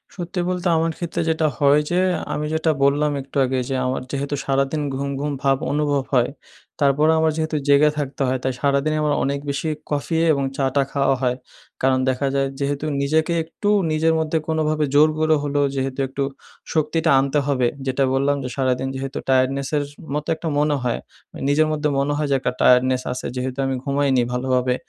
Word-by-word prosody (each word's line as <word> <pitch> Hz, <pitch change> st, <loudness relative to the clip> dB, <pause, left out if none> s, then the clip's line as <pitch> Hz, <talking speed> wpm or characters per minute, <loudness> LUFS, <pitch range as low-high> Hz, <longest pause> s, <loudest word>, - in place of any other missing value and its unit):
সত্যি 180 Hz, 0 st, -4 dB
বলতে 180 Hz, 0 st, -1 dB
আমার 165 Hz, +1 st, +1 dB
ক্ষেত্রে 170 Hz, -1 st, -3 dB
যেটা 160 Hz, -1 st, +2 dB
হয় 145 Hz, 0 st, +4 dB
যে, 180 Hz, -, +2 dB, 0.3 s
আমি 150 Hz, -, -2 dB
যেটা 160 Hz, 0 st, +2 dB
বললাম 145 Hz, +2 st, +3 dB
একটু 135 Hz, +1 st, -7 dB
আগে 130 Hz, 0 st, -1 dB
যে, 135 Hz, -, -1 dB
আমার 130 Hz, +1 st, -1 dB
যেহেতু 140 Hz, +1 st, -2 dB
সারাদিন 140 Hz, +2 st, 0 dB
ঘুম, 140 Hz, +1 st, -3 dB
ঘুম 145 Hz, +1 st, -2 dB
ভাব 135 Hz, -1 st, +3 dB
অনুভব 145 Hz, -1 st, +1 dB
হয়। 125 Hz, -2 st, +3 dB, 0.5 s
তারপরেও 150 Hz, +3 st, +4 dB
আমার 160 Hz, 0 st, +3 dB
যেহেতু 155 Hz, -1 st, -1 dB
জেগে 145 Hz, +1 st, +5 dB
থাকতে 145 Hz, -1 st, -4 dB
হয়। 130 Hz, 0 st, 0 dB
তাই 130 Hz, -, 0 dB
সারাদিনই 140 Hz, +2 st, +1 dB
আমার 150 Hz, -1 st, +2 dB
অনেক 140 Hz, +1 st, -1 dB
বেশি 140 Hz, +3 st, -2 dB, 0.2 s
কফি 150 Hz, +3 st, -1 dB, 0.2 s
এবং 140 Hz, -1 st, -1 dB
চা 135 Hz, -, +1 dB
টা 140 Hz, -, +4 dB
খাওয়া 140 Hz, -1 st, +2 dB
হয়। 125 Hz, -1 st, 0 dB, 0.4 s
কারণ 130 Hz, 0 st, +3 dB
দেখা 130 Hz, +2 st, 0 dB
যায় 135 Hz, 0 st, +2 dB
যেহেতু 140 Hz, +1 st, -2 dB, 0.2 s
নিজেকে 155 Hz, +4 st, +1 dB
একটু 205 Hz, +6 st, -3 dB, 0.2 s
নিজের 160 Hz, +1 st, +2 dB
মধ্যে 160 Hz, 0 st, 0 dB
কোনোভাবে 155 Hz, -1 st, +1 dB
জোর 150 Hz, +2 st, +6 dB
করে 155 Hz, 0 st, +3 dB
হলেও, 145 Hz, 0 st, +1 dB
যেহেতু 135 Hz, 0 st, -2 dB
একটু 135 Hz, +1 st, -3 dB, 0.5 s
শক্তিটা 160 Hz, +1 st, +1 dB
আনতে 140 Hz, +2 st, +1 dB
হবে। 130 Hz, -4 st, +2 dB, 0.2 s
যেটা 130 Hz, +1 st, +1 dB
বললাম 140 Hz, +2 st, +2 dB
যে 125 Hz, -, -4 dB
সারাদিন 130 Hz, -1 st, 0 dB
যেহেতু 135 Hz, 0 st, -5 dB
টায়ার্ডনেসের 135 Hz, +2 st, +1 dB
এস -, -, -12 dB, 0.2 s
মতো 150 Hz, +1 st, -3 dB
একটা 165 Hz, -, -6 dB
মনে 150 Hz, 0 st, +2 dB
হয়। 120 Hz, -2 st, -1 dB, 0.5 s
নিজের 155 Hz, +2 st, +3 dB
মধ্যে 150 Hz, 0 st, 0 dB
মনে 145 Hz, +1 st, 0 dB
হয় 150 Hz, -, -1 dB
যে -, -, +4 dB
একটা 125 Hz, -, -1 dB
টায়ার্ডনেস 125 Hz, 0 st, +4 dB
আছে 125 Hz, -, -6 dB
যেহেতু 130 Hz, +1 st, -3 dB
আমি 135 Hz, 0 st, -1 dB
ঘুমাইনি 140 Hz, -2 st, +1 dB
ভালোভাবে। 125 Hz, 0 st, +1 dB
140 Hz, 190 wpm, -21 LUFS, 135-155 Hz, 0.5 s, জোর